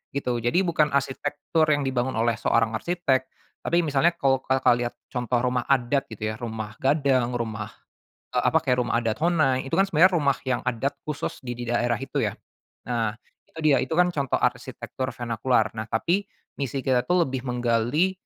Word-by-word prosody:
gitu. 125 Hz, -4 st, -1 dB
Jadi 120 Hz, +12 st, +2 dB
bukan 155 Hz, -4 st, +2 dB
arsitektur 145 Hz, +3 st, 0 dB
yang 145 Hz, -1 st, +2 dB
dibangun 130 Hz, -2 st, -1 dB
oleh 115 Hz, 0 st, +1 dB
seorang 115 Hz, -1 st, +2 dB
arsitek. 150 Hz, -7 st, 0 dB, 0.3 s
Tapi 170 Hz, +1 st, +1 dB
misalnya 160 Hz, +3 st, +2 dB
kalau 135 Hz, -1 st, +2 dB
Kakak 130 Hz, -1 st, +2 dB
lihat 120 Hz, 0 st, -3 dB, 0.2 s
contoh 125 Hz, -1 st, 0 dB
rumah 125 Hz, -1 st, 0 dB
adat, 135 Hz, +1 st, +1 dB
gitu 110 Hz, -1 st, -4 dB
ya. -, -, -6 dB
Rumah 110 Hz, -2 st, -6 dB
Gadang, 135 Hz, -3 st, +2 dB
rumah, 110 Hz, -2 st, -3 dB, 0.7 s
eee, -, -, +3 dB
apa -, -, +4 dB
kayak 125 Hz, 0 st, +2 dB
rumah 115 Hz, -, 0 dB
adat 115 Hz, -2 st, -1 dB
Honai, 155 Hz, -7 st, +2 dB
itu -, -, -1 dB
kan 195 Hz, -, +5 dB
sebenarnya 180 Hz, +2 st, +5 dB
rumah 140 Hz, -4 st, +2 dB
yang 130 Hz, -2 st, +1 dB
adat 125 Hz, +3 st, -1 dB
khusus 150 Hz, +1 st, -4 dB
di 120 Hz, -, -4 dB
di 120 Hz, -, -6 dB
daerah 120 Hz, 0 st, +1 dB
itu 135 Hz, -, -3 dB
ya. -, -, 0 dB, 0.5 s
Nah, 115 Hz, -3 st, -1 dB, 0.3 s
itu 165 Hz, -, -12 dB
dia, 150 Hz, -3 st, +5 dB
itu 130 Hz, -, -9 dB
kan 180 Hz, 0 st, +5 dB
contoh 140 Hz, -6 st, -1 dB
arsitektur 125 Hz, +1 st, -2 dB
venakular. 115 Hz, -1 st, +1 dB
Nah 110 Hz, -, -3 dB
tapi, 170 Hz, -, 0 dB, 0.4 s
misi 135 Hz, 0 st, -2 dB
kita 125 Hz, -2 st, +2 dB
tuh 180 Hz, -1 st, +4 dB
lebih 130 Hz, -1 st, -4 dB
menggali, 125 Hz, +8 st, +1 dB
130 Hz, 180 wpm, -25 LUFS, 120-145 Hz, 0.7 s, kan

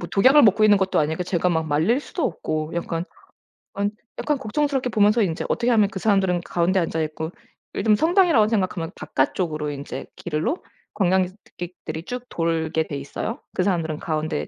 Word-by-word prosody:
뭐 175 Hz, -, -6 dB
독약을 260 Hz, +10 st, +6 dB
먹고 215 Hz, 0 st, +5 dB
있는 205 Hz, -1 st, +6 dB
것도 190 Hz, -1 st, +1 dB
아니니까 160 Hz, +3 st, 0 dB
제가 180 Hz, 0 st, 0 dB
막 160 Hz, -2 st, 0 dB
말릴 160 Hz, -, +2 dB
수도 310 Hz, +2 st, -4 dB
없고 155 Hz, -2 st, -2 dB
약간 170 Hz, 0 st, -2 dB, 0.7 s
안 200 Hz, +1 st, 0 dB, 0.4 s
걱정스럽게 275 Hz, -1 st, 0 dB
보면서 210 Hz, +1 st, +4 dB
인제 170 Hz, -5 st, -1 dB
어떻게 240 Hz, +1 st, 0 dB
하면 215 Hz, -3 st, +4 dB
그 190 Hz, -, -6 dB
사람들은 190 Hz, -4 st, +2 dB
가운데 175 Hz, +2 st, +1 dB
앉아 165 Hz, -1 st, -1 dB
있고 160 Hz, +2 st, -4 dB, 0.4 s
요즘 215 Hz, -2 st, +3 dB
성당이라고 325 Hz, -, +4 dB
생각하면 185 Hz, -5 st, -1 dB
바깥쪽으로 150 Hz, +2 st, -1 dB
인제 140 Hz, 0 st, -6 dB
길로 175 Hz, -, -1 dB, 0.4 s
관광객들이 180 Hz, -3 st, -2 dB
쭉 250 Hz, +4 st, -6 dB
돌게 160 Hz, -1 st, 0 dB
돼 145 Hz, -, -3 dB
있어요. 210 Hz, -, -5 dB
그 185 Hz, -, +1 dB
사람들은 165 Hz, -5 st, -1 dB
가운데 155 Hz, -1 st, -2 dB
180 Hz, 385 characters per minute, -23 LUFS, 160-215 Hz, 0.7 s, 독약을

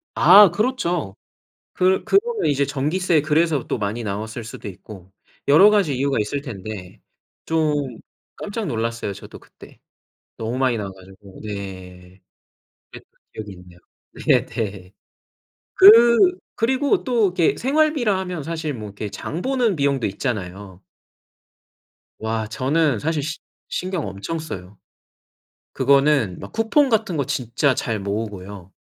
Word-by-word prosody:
아 195 Hz, +2 st, +8 dB
그렇죠. 175 Hz, -, -1 dB, 0.6 s
그 185 Hz, +1 st, +2 dB
그러면 455 Hz, +3 st, +1 dB
이제 140 Hz, -1 st, +1 dB
전기세 150 Hz, +4 st, 0 dB
그래서 155 Hz, -2 st, +1 dB
또 -, -, -1 dB
많이 105 Hz, +3 st, -3 dB
나왔을 110 Hz, +3 st, -5 dB
수도 115 Hz, -, -9 dB
있고 95 Hz, 0 st, -12 dB, 0.3 s
여러 160 Hz, +9 st, +7 dB
가지 190 Hz, -11 st, +2 dB
이유가 140 Hz, +1 st, 0 dB
있을 110 Hz, +7 st, -2 dB
텐데 105 Hz, -7 st, -8 dB, 0.4 s
좀 150 Hz, -6 st, -1 dB, 0.4 s
깜짝 210 Hz, +1 st, -5 dB
놀랐어요 115 Hz, -, -3 dB
저도 100 Hz, -, -11 dB
그때. -, -, -17 dB, 0.6 s
너무 115 Hz, +3 st, -4 dB
많이 130 Hz, -3 st, +1 dB
나와 100 Hz, -3 st, -4 dB
가지고 95 Hz, +1 st, -16 dB
네. 95 Hz, -3 st, -9 dB, 0.7 s
그랬던 -, -, -14 dB, 0.2 s
기억이 105 Hz, -2 st, -8 dB
있네요. 90 Hz, -1 st, -15 dB, 0.5 s
네네. 100 Hz, -4 st, 0 dB, 0.8 s
그 235 Hz, -, +7 dB, 0.2 s
그리고 265 Hz, -, +1 dB
또 240 Hz, -4 st, +2 dB
이렇게 180 Hz, -3 st, +1 dB
생활비라 275 Hz, -6 st, +1 dB
하면 180 Hz, -5 st, -5 dB
사실 160 Hz, -1 st, -4 dB
뭐 110 Hz, -3 st, -7 dB
이렇게 100 Hz, +1 st, -6 dB
장 155 Hz, -, -6 dB
보는 250 Hz, -5 st, +1 dB
비용도 140 Hz, -4 st, 0 dB
있잖아요. 100 Hz, -3 st, -5 dB, 1.4 s
와 110 Hz, 0 st, -2 dB
저는 140 Hz, +3 st, 0 dB
사실 155 Hz, +4 st, -1 dB
시 150 Hz, +2 st, -4 dB, 0.3 s
신경 185 Hz, -, -3 dB
엄청 100 Hz, -, -5 dB
써요. 100 Hz, -, -8 dB, 1.0 s
그거는 135 Hz, -7 st, +2 dB
막 -, -, -9 dB
쿠폰 245 Hz, +6 st, +2 dB
같은 220 Hz, -6 st, 0 dB
거 140 Hz, -, 0 dB
진짜 125 Hz, +2 st, 0 dB
잘 115 Hz, -4 st, -2 dB
모으고요. 100 Hz, -2 st, -6 dB
140 Hz, 265 characters per minute, -21 LUFS, -, 1.4 s, 아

